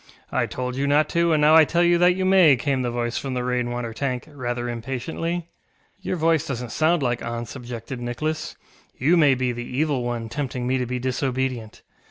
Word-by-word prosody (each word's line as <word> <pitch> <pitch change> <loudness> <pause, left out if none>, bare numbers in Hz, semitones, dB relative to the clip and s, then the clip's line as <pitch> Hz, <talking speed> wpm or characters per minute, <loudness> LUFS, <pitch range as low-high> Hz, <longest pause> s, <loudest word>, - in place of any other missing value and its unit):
ŌĆ£I - - +1
told 125 0 -4
you 140 +1 -1
not 145 +2 +3
to, 170 0 +2
and 155 - +3
now 150 +1 +6
I 160 - +9
tell 170 +3 +1
you 175 0 +4
that 180 0 +5
you 190 0 -1
may, 185 -6 +6
ŌĆØ - - -14
came 135 0 0
the 125 - -1
voice 120 0 -2
from 135 -2 -4
the 125 - -1
rain 125 -1 -1
water 120 -1 -4
tank, 125 0 -2
rather 120 -3 -3
impatiently. 135 +8 -4 0.6
ŌĆ£Your - - -1
voice 165 -2 +1
doesnŌĆÖt 125 -3 -4
sound 160 -1 +2
like 120 -1 0
auntŌĆÖs, 115 0 -4
ŌĆØ - - -9
objected 120 0 -7
Nicholas; 155 +6 -3 0.4
ŌĆ£you 155 +7 +4
may 145 -5 +5
be 125 -1 0
the 120 0 -5
Evil 145 -4 +1
One 120 -1 -3
tempting 125 +1 -4
me 130 +1 +1
to 125 - -2
be 125 +1 -2
disobedient. 130 -2 -2
130 Hz, 220 wpm, -23 LUFS, 120-155 Hz, 0.6 s, I